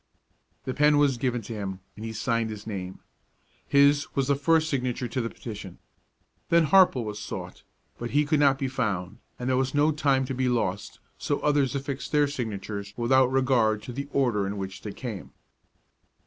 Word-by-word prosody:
The 130 - -2
pen 150 +1 +4
was 145 -2 +3
given 120 -2 -1
to 115 - -7
him, 95 -3 -5 0.2
and 105 - -9
he 115 - -4
signed 115 +1 -1
his 105 -1 -7
name. 95 -4 -6 0.7
His 140 +1 +4
was 135 -1 +1
the 140 - +4
first 160 +3 +2
signature 125 -4 -1
to 120 +2 -2
the 115 - -2
petition. 105 -7 -8 0.7
Then 170 -1 +5
Harple 175 -7 +5
was 105 -1 -5
sought; - - -7 0.4
but 120 - -4
he 150 +4 +2
could 150 0 +2
not 140 -2 +4
be 135 -1 -2
found, 105 -7 -2 0.2
and 125 - -5
there 130 -1 +2
was 135 +2 -2
no 150 +2 +4
time 140 -3 +1
to 135 - -4
be 130 0 0
lost, 105 -5 -2 0.2
so 145 - -1
others 145 -4 +2
affixed 140 0 -4
their 150 -1 +4
signatures 105 -6 -5
without 130 +2 +3
regard 120 -5 +2
to 125 - -7
the 140 +3 -4
order 120 -8 +1
in 100 +1 -4
which 95 -1 -6
they 105 - -6
came. 110 -4 -7
125 Hz, 190 wpm, -26 LUFS, 110-140 Hz, 0.7 s, Then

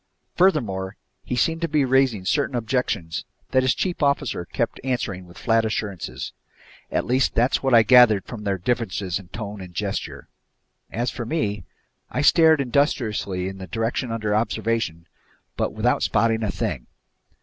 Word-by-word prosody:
Furthermore, 105 - +1 0.3
he 125 - -3
seemed 165 +6 +1
to 170 - +1
be 150 -3 +2
raising 130 -7 +2
certain 140 +4 +1
objections 110 -8 -1 0.3
that 130 - +4
his 130 0 +2
chief 180 -3 -2
officer 140 -10 0
kept 80 - -2
answering 105 -8 -2
with 85 0 -15
flat 115 +1 +2
assurances. 100 - -4 0.6
At - - 0
least 130 +2 +1
that's 120 +3 +2
what 135 -2 +3
I 115 - +8
gathered 115 -4 +6
from 110 -4 -8
their 100 -2 0
differences 95 -3 -1
in 95 - -13
tone 100 +1 -6
and 90 -2 -10
gesture. - - -4 0.6
As 120 +2 -2
for 120 - -5
me, 105 - -2 0.4
I - - -1
stared 160 -1 +6
industriously 115 - 0
in 95 0 -7
the 95 - -7
direction 115 +3 -2
under 110 -2 -1
observation 110 -6 -1 0.5
but - - -1
without - - +1
spotting 115 -1 +2
a 110 - -1
thing. - - -3
115 Hz, 160 wpm, -23 LUFS, 95-130 Hz, 0.6 s, I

